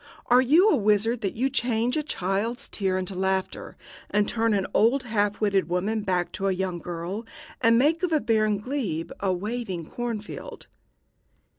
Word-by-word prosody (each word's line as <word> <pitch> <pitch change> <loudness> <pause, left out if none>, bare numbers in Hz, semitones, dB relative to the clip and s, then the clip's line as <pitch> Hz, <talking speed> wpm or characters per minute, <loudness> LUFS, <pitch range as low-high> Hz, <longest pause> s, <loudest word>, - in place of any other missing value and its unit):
Are 250 +1 +7
you 315 - +5
a - - +4
wizard 215 +1 +2
that 195 - -2
you 255 +4 +1
change 240 -1 0
a 310 - +1
child's 230 - -2
tears 190 -2 -1
into 185 +1 -3
laughter, 190 0 -2 0.3
and 205 0 +2
turn 225 -2 +1
an 195 -2 0
old 250 +5 +3
half 210 -3 0
witted 200 -4 +1
woman 200 +5 0
back 180 -3 -1
to 195 - -2
a - - +2
young 185 -2 -2
girl, 175 +5 -5 0.4
and 230 -1 +5
make 305 +6 +3
of 360 -2 0
a 310 - +3
barren 215 -4 +2
glebe 210 - -3
a 195 -1 0
waving 190 -3 -4
corn 240 -2 -3
field?" 210 - -9
210 Hz, 175 wpm, -26 LUFS, 190-240 Hz, 0.4 s, Are